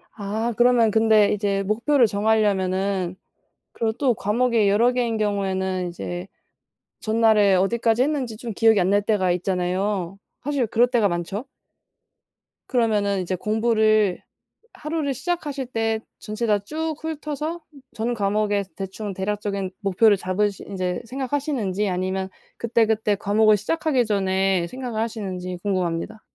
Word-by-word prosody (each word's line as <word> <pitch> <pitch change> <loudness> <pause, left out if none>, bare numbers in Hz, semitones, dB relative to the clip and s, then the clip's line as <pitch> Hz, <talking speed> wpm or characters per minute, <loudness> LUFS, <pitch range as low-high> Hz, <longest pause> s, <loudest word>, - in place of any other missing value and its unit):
아. 220 +3 -2
그러면 240 -3 +4
근데 220 -1 +4
이제 200 -1 0
목표를 235 +6 +3
정하려면은 195 -3 +1 0.6
그리고 225 -1 -1
또 250 0 +1
과목이 225 0 +1
여러 230 +5 +4
개인 240 -3 0
경우에는 190 -3 -1
이제 90 - -6 0.7
전날에 215 -3 +4
어디까지 225 +5 +2
했는지 265 -6 -1
좀 235 -1 -6
기억이 220 -1 +4
안 180 +2 +2
날 205 0 +3
때가 200 -4 +1
있잖아요. 185 +1 -1 0.2
사실 280 -4 0
그럴 235 +3 +3
때가 230 -5 +2
많죠? 175 +7 -3 1.2
그러면은 210 -6 +1
이제 185 +1 -2
공부를 215 -1 +2 0.5
하루를 305 -2 -2
시작하실 285 -1 -3
때 225 -2 -1 0.2
전체 215 +2 -4
다 205 -1 +3
쭉 315 +8 -4
훑어서 310 +1 -4 0.3
전 230 +2 -2
과목에 205 -1 0
대충 195 +1 -5
대략적인 200 -1 -3
목표를 205 +2 +4
잡으시 195 +2 -1
이제 180 -2 -2
생각하시는지 255 -6 -2
아니면 185 +1 -2 0.3
그때그때 220 -3 +1
과목을 210 +1 +3
시작하기 270 - 0
전에 190 -3 +1
생각을 250 -2 -4
하시는지 190 -5 -4
궁금합니다. 185 +2 -2
210 Hz, 315 characters per minute, -23 LUFS, 195-235 Hz, 1.2 s, 그러면